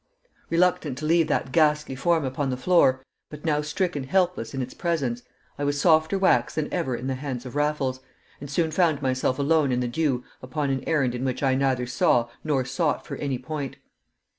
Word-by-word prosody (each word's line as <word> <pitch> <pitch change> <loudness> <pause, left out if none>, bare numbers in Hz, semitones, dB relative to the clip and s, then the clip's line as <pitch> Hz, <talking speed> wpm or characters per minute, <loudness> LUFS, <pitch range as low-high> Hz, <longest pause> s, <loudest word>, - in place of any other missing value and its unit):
Reluctant 165 -5 +1
to 155 - -5
leave 165 0 +3
that 130 -3 -1
ghastly 150 -2 +2
form 160 +2 +1
upon 135 +1 -2
the 130 - -2
floor, 130 -4 +3 0.2
but 150 +1 -10
now 150 -2 +2
stricken 150 0 -2
helpless 180 -5 0
in 135 - -4
its 125 -1 -4
presence, 140 -9 -1 0.4
I - - -1
was 145 0 0
softer 160 +4 +4
wax 125 -11 +2
than 155 -2 -2
ever 160 -8 -1
in 120 - -6
the 135 - -1
hands 130 -2 -5
of 125 - -8
Raffles, 145 -3 0 0.4
and 140 - -8
soon 160 +3 0
found 160 -5 +2
myself 130 0 0
alone 145 -1 +2
in 125 - +1
the 125 - -1
dew 130 -1 0 0.2
upon 140 +2 -2
an 135 -1 -2
errand 140 -7 +1
in 125 +1 -4
which 130 +1 -2
I 135 -1 +3
neither 130 -2 +1
saw 125 -2 +2
nor 140 -4 0
sought 150 +3 -1
for - - -5
any 140 -3 -2
point. 140 +2 -5
140 Hz, 200 wpm, -25 LUFS, 130-160 Hz, 0.4 s, softer